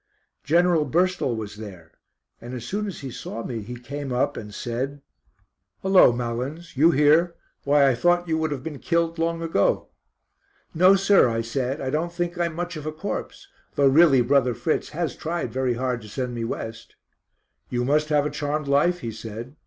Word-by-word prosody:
General 170 Hz, +1 st, +3 dB
Burstall 175 Hz, -5 st, +1 dB
was 105 Hz, -2 st, -6 dB
there, 95 Hz, -7 st, -10 dB, 0.5 s
and 120 Hz, +2 st, -7 dB
as 120 Hz, -1 st, -6 dB
soon 210 Hz, +8 st, -2 dB
as 190 Hz, -, -7 dB
he 135 Hz, -2 st, -6 dB
saw 115 Hz, -1 st, -6 dB
me 115 Hz, -3 st, -4 dB
he 120 Hz, +4 st, -7 dB
came 135 Hz, +3 st, -6 dB
up 135 Hz, +4 st, 0 dB
and 105 Hz, -1 st, -7 dB
said: 130 Hz, +6 st, -4 dB, 0.8 s
"Hullo, 190 Hz, -8 st, +6 dB
Malins, 125 Hz, +8 st, -4 dB
you 155 Hz, +5 st, +5 dB
here? 160 Hz, +3 st, +4 dB, 0.3 s
Why 140 Hz, 0 st, +5 dB
I 135 Hz, -, +4 dB
thought 175 Hz, +7 st, +2 dB
you 160 Hz, -, +1 dB
would 160 Hz, 0 st, 0 dB
have 140 Hz, -3 st, -4 dB
been 150 Hz, -3 st, -6 dB
killed 170 Hz, -1 st, 0 dB
long 165 Hz, 0 st, -1 dB
ago." 165 Hz, -11 st, +1 dB, 0.8 s
"No, 185 Hz, +4 st, +6 dB
sir," 195 Hz, -8 st, +4 dB
I 115 Hz, 0 st, -1 dB
said, 130 Hz, +4 st, -2 dB
"I 130 Hz, -, -2 dB
don't 160 Hz, +4 st, -1 dB
think 175 Hz, 0 st, -3 dB
I 175 Hz, -, +2 dB
am 170 Hz, -2 st, -4 dB
much 175 Hz, +1 st, -4 dB
of 155 Hz, 0 st, -6 dB
a -, -, -1 dB
corpse, 170 Hz, +6 st, -6 dB, 0.3 s
though 140 Hz, -, +3 dB
really 140 Hz, -2 st, +6 dB
Brother 125 Hz, -1 st, +2 dB
Fritz 120 Hz, +7 st, -1 dB
has 165 Hz, +1 st, -3 dB
tried 170 Hz, +2 st, -4 dB
very 130 Hz, -2 st, 0 dB
hard 125 Hz, -1 st, -2 dB
to 105 Hz, -, -11 dB
send 125 Hz, +2 st, -3 dB
me 115 Hz, -1 st, -3 dB
West." 115 Hz, 0 st, -6 dB, 0.7 s
"You 125 Hz, 0 st, -1 dB
must 150 Hz, +3 st, +1 dB
have 145 Hz, -1 st, +2 dB
a 150 Hz, -, -2 dB
charmed 150 Hz, 0 st, -2 dB
life," 170 Hz, +6 st, +2 dB
he 115 Hz, -, -4 dB
said. 115 Hz, +4 st, -8 dB
145 Hz, 190 wpm, -24 LUFS, 120-165 Hz, 0.8 s, Hullo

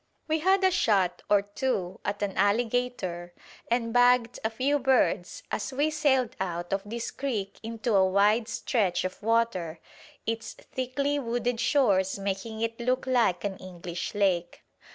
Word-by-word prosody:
We 315 Hz, 0 st, +1 dB
had 380 Hz, +4 st, +3 dB
a 375 Hz, -, +5 dB
shot 200 Hz, -, +2 dB
or 205 Hz, -1 st, +4 dB
two 205 Hz, -3 st, -2 dB
at 205 Hz, 0 st, -2 dB
an 195 Hz, -2 st, -2 dB
alligator 205 Hz, -4 st, 0 dB, 0.3 s
and 230 Hz, -1 st, 0 dB
bagged 245 Hz, -1 st, +4 dB
a 220 Hz, -, +1 dB
few 265 Hz, +6 st, 0 dB
birds 240 Hz, -9 st, +1 dB
as 220 Hz, -, -2 dB
we 290 Hz, +4 st, +1 dB
sailed 265 Hz, -6 st, +1 dB
out 175 Hz, 0 st, -3 dB
of 195 Hz, -, 0 dB
this 230 Hz, +3 st, -5 dB
creek 220 Hz, -8 st, -3 dB
into 225 Hz, 0 st, -3 dB
a 190 Hz, -1 st, +4 dB
wide 210 Hz, +4 st, +3 dB
stretch 205 Hz, -7 st, 0 dB
of 185 Hz, +3 st, -5 dB
water, 215 Hz, -8 st, 0 dB, 0.5 s
its 225 Hz, 0 st, -3 dB
thickly 280 Hz, +3 st, -2 dB
wooded 240 Hz, -1 st, -1 dB
shores 200 Hz, -8 st, +2 dB
making 200 Hz, +3 st, -4 dB
it 230 Hz, 0 st, -2 dB
look 255 Hz, +2 st, 0 dB
like 235 Hz, -9 st, +2 dB
an 195 Hz, -2 st, -3 dB
English 175 Hz, +1 st, -6 dB
lake. 185 Hz, -4 st, 0 dB
225 Hz, 155 wpm, -28 LUFS, 190-250 Hz, 0.5 s, a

